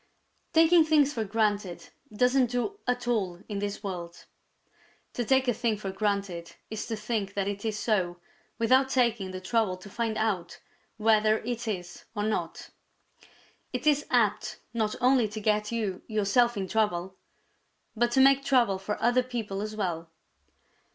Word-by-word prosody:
_ -, -, -44 dB
Taking 330 Hz, +1 st, +6 dB
things 300 Hz, -2 st, +3 dB
for 225 Hz, -, -1 dB
granted 205 Hz, -5 st, -1 dB, 0.2 s
doesn't 250 Hz, +3 st, +3 dB
do 245 Hz, -, -2 dB
at 245 Hz, -1 st, -1 dB
all 190 Hz, -7 st, -1 dB
in 205 Hz, -2 st, -4 dB
this 205 Hz, +1 st, -4 dB
world. 175 Hz, -3 st, -6 dB, 0.9 s
To 245 Hz, -, -1 dB
take 265 Hz, +2 st, +2 dB
a 245 Hz, -, +3 dB
thing 225 Hz, -1 st, 0 dB
for 195 Hz, -2 st, -5 dB
granted 195 Hz, -4 st, -2 dB, 0.2 s
is 220 Hz, -1 st, -4 dB
to 230 Hz, -, -2 dB
think 210 Hz, -2 st, -3 dB
that 200 Hz, -1 st, -1 dB
it 200 Hz, 0 st, -4 dB
is 220 Hz, -2 st, -2 dB
so 185 Hz, -6 st, 0 dB, 0.4 s
without 260 Hz, +4 st, +3 dB
taking 235 Hz, -7 st, +1 dB
the 185 Hz, 0 st, -6 dB
trouble 200 Hz, -1 st, 0 dB
to 195 Hz, +2 st, -13 dB
find 225 Hz, -1 st, -2 dB
out 195 Hz, -6 st, -1 dB, 0.4 s
whether 215 Hz, 0 st, +4 dB
it 240 Hz, 0 st, -4 dB
is 180 Hz, -4 st, -5 dB
or 205 Hz, -, -1 dB
not. 215 Hz, 0 st, -3 dB, 1.0 s
It 250 Hz, +2 st, -3 dB
is 295 Hz, -1 st, +3 dB
apt 220 Hz, -5 st, +1 dB, 0.2 s
not 220 Hz, -2 st, 0 dB
only 250 Hz, -2 st, +4 dB
to 210 Hz, +1 st, -6 dB
get 210 Hz, 0 st, 0 dB
you 215 Hz, -5 st, -2 dB
yourself 215 Hz, +2 st, +2 dB
into 190 Hz, -2 st, -3 dB
trouble, 190 Hz, -4 st, 0 dB, 0.8 s
but 240 Hz, +2 st, +2 dB
to 265 Hz, -, +5 dB
make 275 Hz, 0 st, +5 dB
trouble 240 Hz, -9 st, +3 dB
for 200 Hz, +2 st, -4 dB
other 245 Hz, +2 st, +4 dB
people 230 Hz, -6 st, -4 dB
as 215 Hz, +1 st, -5 dB
well. 170 Hz, -5 st, -3 dB
215 Hz, 165 wpm, -28 LUFS, 200-245 Hz, 1.0 s, Taking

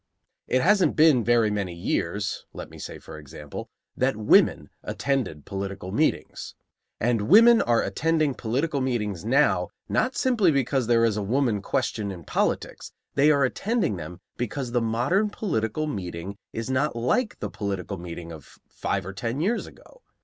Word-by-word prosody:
It 130 Hz, -, +2 dB
hasn't 195 Hz, -1 st, +4 dB
been 150 Hz, -6 st, +5 dB
very 115 Hz, -2 st, +3 dB
many 100 Hz, -4 st, -2 dB
years, 95 Hz, +3 st, -2 dB
let -, -, -8 dB
me -, -, -12 dB
say -, -, -7 dB
for 75 Hz, -, -11 dB
example, 75 Hz, 0 st, -9 dB, 0.3 s
that 130 Hz, -3 st, +1 dB
women 105 Hz, -1 st, +3 dB
attended 130 Hz, -, -2 dB
political 100 Hz, -1 st, -5 dB
meetings. -, -, -1 dB, 0.4 s
And 115 Hz, -2 st, 0 dB
women 230 Hz, +5 st, +8 dB
are 120 Hz, -1 st, +2 dB
attending 155 Hz, -3 st, +1 dB
political 135 Hz, +6 st, -1 dB
meetings 105 Hz, -8 st, -2 dB
now 135 Hz, +7 st, +3 dB, 0.2 s
not 255 Hz, +1 st, 0 dB
simply 235 Hz, -8 st, +3 dB
because 135 Hz, -3 st, +1 dB
there 115 Hz, -1 st, +4 dB
is 110 Hz, -2 st, +1 dB
a -, -, -1 dB
woman 115 Hz, 0 st, 0 dB
question 105 Hz, +1 st, -1 dB
in 90 Hz, -3 st, -9 dB
politics; -, -, -2 dB, 0.2 s
they 140 Hz, +2 st, +4 dB
are 140 Hz, -2 st, +4 dB
attending 195 Hz, -, 0 dB
them 85 Hz, +2 st, -8 dB, 0.2 s
because 125 Hz, +1 st, -3 dB
the 120 Hz, 0 st, +1 dB
modern 125 Hz, -, +1 dB
political 155 Hz, -, -2 dB
meeting 95 Hz, -, -5 dB, 0.2 s
is 115 Hz, 0 st, -4 dB
not 130 Hz, +2 st, 0 dB
like 165 Hz, -, 0 dB
the 105 Hz, -, -5 dB
political 100 Hz, -2 st, -4 dB
meeting 85 Hz, -1 st, -7 dB
of 80 Hz, -4 st, -12 dB
five 95 Hz, -2 st, -2 dB
or 95 Hz, -, -6 dB
ten 115 Hz, +6 st, -3 dB
years 205 Hz, +9 st, 0 dB
ago. -, -, -17 dB
115 Hz, 160 wpm, -25 LUFS, 100-145 Hz, 0.4 s, women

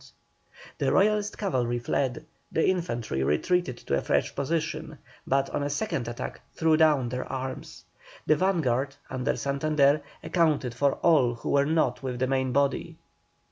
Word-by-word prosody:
The -, -, +1 dB
Royalist 210 Hz, +1 st, +2 dB
cavalry 125 Hz, -, 0 dB
fled, 130 Hz, +4 st, -1 dB, 0.3 s
the 160 Hz, -, +2 dB
infantry 120 Hz, -, -1 dB
retreated 130 Hz, -, +1 dB
to -, -, +1 dB
a 70 Hz, -, 0 dB
fresh -, -, 0 dB
position, 160 Hz, +1 st, -2 dB, 0.3 s
but 135 Hz, 0 st, +1 dB
on 145 Hz, -, -1 dB
a 145 Hz, -, -1 dB
second 140 Hz, -4 st, -2 dB
attack 120 Hz, 0 st, -6 dB
threw 160 Hz, -1 st, +3 dB
down 150 Hz, -6 st, +3 dB
their 125 Hz, +1 st, -4 dB
arms. 130 Hz, 0 st, -6 dB, 0.4 s
The 155 Hz, -, +4 dB
vanguard, 145 Hz, -8 st, 0 dB, 0.2 s
under 130 Hz, 0 st, -1 dB
Santander, 140 Hz, +1 st, +2 dB, 0.2 s
accounted 155 Hz, -8 st, +1 dB
for 140 Hz, +3 st, +2 dB
all 135 Hz, -8 st, +3 dB
who 115 Hz, -, -4 dB
were 140 Hz, 0 st, +3 dB
not 160 Hz, 0 st, +1 dB
with 130 Hz, -2 st, -4 dB
the 130 Hz, -, +1 dB
main 130 Hz, 0 st, 0 dB
body. 140 Hz, +1 st, 0 dB
140 Hz, 150 wpm, -27 LUFS, 125-160 Hz, 0.4 s, The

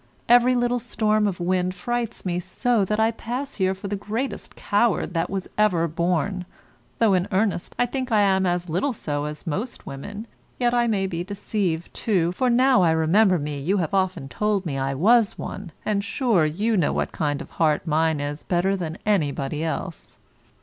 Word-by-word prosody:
Every 245 Hz, +1 st, +5 dB
little 245 Hz, 0 st, +1 dB
storm 215 Hz, -2 st, +1 dB
of 185 Hz, -3 st, -3 dB
wind 180 Hz, +1 st, 0 dB
frights 240 Hz, 0 st, -3 dB
me 175 Hz, -1 st, -1 dB
so, 215 Hz, +5 st, 0 dB
that 210 Hz, +3 st, -1 dB
I 220 Hz, +1 st, +3 dB
pass 250 Hz, +5 st, -5 dB
here 190 Hz, -1 st, +1 dB
for 195 Hz, +2 st, -7 dB
the 205 Hz, -, -2 dB
greatest 220 Hz, +7 st, -4 dB
coward 205 Hz, -3 st, +1 dB
that 165 Hz, -1 st, 0 dB, 0.3 s
ever 190 Hz, -6 st, +3 dB
was 165 Hz, -, -5 dB
born, 180 Hz, +2 st, 0 dB, 0.5 s
though, 225 Hz, -4 st, +4 dB
in 185 Hz, +1 st, +1 dB
earnest, 195 Hz, -2 st, 0 dB
I 245 Hz, -, +3 dB
think 255 Hz, 0 st, -4 dB
I 215 Hz, -2 st, +4 dB
am 190 Hz, -2 st, +3 dB
as 175 Hz, 0 st, -1 dB
little 185 Hz, -, 0 dB
so 145 Hz, -8 st, -3 dB
as 150 Hz, 0 st, -7 dB
most 205 Hz, -, -4 dB
women, 205 Hz, +11 st, -7 dB, 0.3 s
yet 240 Hz, -1 st, +2 dB
I 240 Hz, -1 st, +3 dB
may 200 Hz, -4 st, +1 dB
be 175 Hz, -2 st, -3 dB
deceived, 195 Hz, -3 st, -3 dB
too, 180 Hz, -6 st, +1 dB
for 250 Hz, +8 st, 0 dB
now 250 Hz, -2 st, +4 dB
I 175 Hz, -, +4 dB
remember 180 Hz, +5 st, +4 dB
me 145 Hz, -2 st, -4 dB
you 180 Hz, +9 st, 0 dB
have 175 Hz, 0 st, -1 dB
often 185 Hz, -7 st, 0 dB
told 205 Hz, +5 st, -1 dB
me 150 Hz, -5 st, -3 dB
I 135 Hz, 0 st, -1 dB
was 215 Hz, -, +4 dB
one, 190 Hz, -4 st, -6 dB
and, 205 Hz, -2 st, 0 dB
sure, 225 Hz, -, +2 dB
you 210 Hz, +9 st, 0 dB
know 175 Hz, -6 st, +2 dB
what -, -, -1 dB
kind 145 Hz, -2 st, -1 dB
of -, -, -9 dB
heart 155 Hz, -2 st, +1 dB
mine 160 Hz, -1 st, +1 dB
is 145 Hz, +1 st, -4 dB
better 185 Hz, +2 st, +1 dB
than 170 Hz, -3 st, -4 dB
anybody 150 Hz, -6 st, 0 dB
else. 165 Hz, +1 st, -5 dB
190 Hz, 190 wpm, -24 LUFS, 165-220 Hz, 0.5 s, Every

